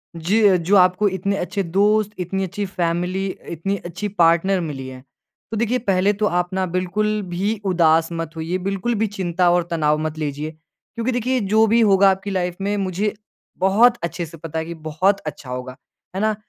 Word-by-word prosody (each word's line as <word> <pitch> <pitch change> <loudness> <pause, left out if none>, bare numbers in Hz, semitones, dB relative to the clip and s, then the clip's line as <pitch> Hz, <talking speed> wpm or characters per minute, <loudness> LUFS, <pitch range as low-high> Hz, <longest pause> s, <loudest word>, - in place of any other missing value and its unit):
जी 190 +4 +3
जो 180 +4 +1
आपको 185 +2 +4
इतने 190 +1 -2
अच्छे 195 +3 -2
दोस्त 205 +4 +2
इतनी 190 +2 -2
अच्छी 200 +2 -3
फ़ैमिली 180 0 -1 0.3
इतनी 195 +5 -2
अच्छी 175 +4 -4
पार्टनर 170 +3 +4
मिली 140 -5 -5
है। 130 0 -9 0.5
तो 225 - -2
देखिए 235 +3 +1
पहले 195 -3 +2
तो 210 +1 -1
आप 180 -2 0
ना 190 0 0
बिल्कुल 185 +4 -1
भी 190 +5 -1
उदास 165 -3 +3
मत 165 -1 -5
होइए। 165 +3 -2
बिल्कुल 195 +5 -2
भी 220 +1 +1
चिंता 180 -3 0
और 175 0 +3
तनाव 150 -2 +2
मत 155 0 -3
लीजिए। 150 0 -3
क्योंकि 160 - -7
देखिए 250 +1 0 0.2
जो 220 0 +6
भी 230 +2 +3
होगा 195 -2 +5
आपकी 195 +1 -4
लाइफ 180 -2 -2
में 200 +1 0
मुझे 195 +2 -1 0.5
बहुत 225 +6 +4
अच्छे 170 +1 -3
से 165 +1 -12
पता 160 0 -5
है 160 - -3
कि 170 - -6
बहुत 165 +5 0
अच्छा 145 -3 -7
होगा, 125 0 -5 0.4
है 190 - -1
ना। 215 0 +1
185 Hz, 190 wpm, -21 LUFS, 165-205 Hz, 0.5 s, जो